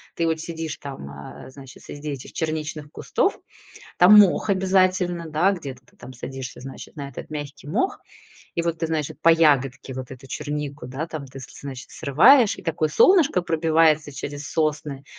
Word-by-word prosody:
Ты 165 -1 0
вот 160 -1 0
сидишь 165 -2 -5
там, 135 - -8
а, 70 - -10
значит, 135 -1 -13
среди 145 +1 -7
этих 135 -3 -8
черничных 155 -2 -4
кустов- - - -1 0.6
там 200 +4 +9
мох 205 +1 +5
обязательно, 185 -3 +1
да, 180 +6 +3
где-то 135 -8 -7
ты - - -26
там 130 - -11
садишься, 130 0 -7
значит, 135 +4 -10
на 140 -1 -5
этот 140 - -9
мягкий 145 -1 -7
мох 375 - -1 0.5
и 170 - 0
вот 165 -1 -2
ты, 165 - -2
значит, 155 -2 -3
по 165 - +5
ягодке 135 -5 +3
вот 130 0 -7
эту 130 +1 -11
чернику, 145 -2 -5
да, 140 +6 -4
там, 155 -4 -7
ты, 135 +1 -11
с 130 - -9
лес - - -14
значит, 135 -3 -8
срываешь. 210 - +5
И - - -10
такое 155 -2 0
солнышко 315 - +5
пробивается 160 -2 +2
через 145 +2 -6
сосны, 150 -3 -1
150 Hz, 180 wpm, -23 LUFS, 135-165 Hz, 0.6 s, там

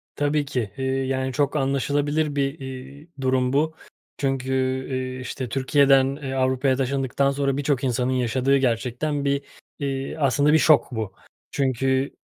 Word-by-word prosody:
Tabii 145 0 +1
ki. 120 -7 -3
Eee, 130 - -2
yani, 130 0 -1
çok 145 +2 0
anlaşılabilir 145 +2 0
bir, 140 +2 -1
eee, 135 +3 -9
durum 130 0 +1
bu. 160 +3 +1 0.4
Çünkü, 135 -1 -1 0.4
eee, 130 0 -3
işte, 130 -1 -5
Türkiye'den, 135 +1 +3
eee, 135 0 -3
Avrupa'ya 130 0 +1
taşındıktan 135 +1 0
sonra 140 -1 0
birçok 140 -2 0
insanın 125 0 0
yaşadığı 130 +2 +2
gerçekten 130 +3 -1
bir, 140 0 +1 0.4
eee, 135 0 -3
aslında, 145 +1 +3
bir - - +7
şok 155 -3 +5
bu. 110 -5 -4 0.4
Çünkü, 135 0 0
135 Hz, 140 wpm, -24 LUFS, 130-140 Hz, 0.4 s, bir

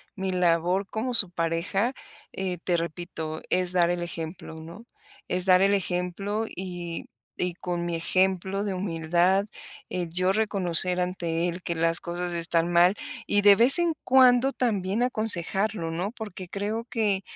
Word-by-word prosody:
mi 190 -2 -3
labor 180 +2 +1
como 235 +5 -3
su 195 -6 +4
pareja, 170 +8 -1 0.4
eh, 185 -3 -4
te 175 -2 +1
repito, 165 -1 -5
es 180 -1 +1
dar 175 -2 +2
el 175 0 -1
ejemplo, 165 -1 -7
¿no?, 165 +8 -11 0.4
es 180 0 0
dar 185 -1 +5
el 200 +1 +3
ejemplo 195 +3 -2
y 175 -2 -6 0.3
y 180 -1 -1
con 175 0 -4
mi 170 - -2
ejemplo 190 +3 0
de 200 -2 -2
humildad, 180 +1 +1 0.4
el 175 -2 -3
yo 185 +2 +1
reconocer 185 -4 +1
ante 175 -2 -1
él 175 +1 -5
que 170 - -3
las 165 +1 +3
cosas 175 0 -4
están 170 0 0
mal, 175 +3 +4 0.3
y 205 0 +2
de 200 -1 +8
vez 240 - +7
en 345 -1 +1
cuando 255 0 +5
también 210 -2 -1
aconsejarlo, 205 -5 +1
¿no?, 175 +5 -3
porque 195 -6 -8
creo 215 +3 -3
que 210 -4 0
180 Hz, 155 wpm, -26 LUFS, 170-200 Hz, 0.4 s, de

